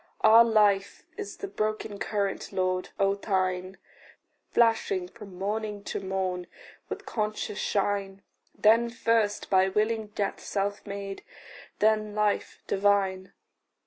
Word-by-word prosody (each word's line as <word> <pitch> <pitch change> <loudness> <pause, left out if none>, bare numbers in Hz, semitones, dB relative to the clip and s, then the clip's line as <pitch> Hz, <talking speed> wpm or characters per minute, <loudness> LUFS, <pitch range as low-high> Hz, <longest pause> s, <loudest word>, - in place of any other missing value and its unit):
Our 225 +2 +8
life 205 -3 +2
is 415 -1 -6
the 400 - -5
broken 215 - -3
current, 200 -2 -2
Lord, 185 0 -1
of 195 0 +1
thine, 185 -1 -1 0.7
Flashing 225 -6 +2
from 195 -1 -12
morn 210 +1 -3
to - - -3
morn 190 -2 -2 0.4
with - - -6
conscious 215 -1 -3
shine 200 -1 -1 0.3
Then 230 +2 +4
first 230 -3 0
by 190 0 +5
willing 215 +2 0
death 205 -1 -3
self 200 +1 -3
made, 200 -1 -5 0.6
then 215 -1 +2
life 210 -1 0
divine. 195 -1 +1
205 Hz, 115 wpm, -28 LUFS, 195-215 Hz, 0.7 s, Our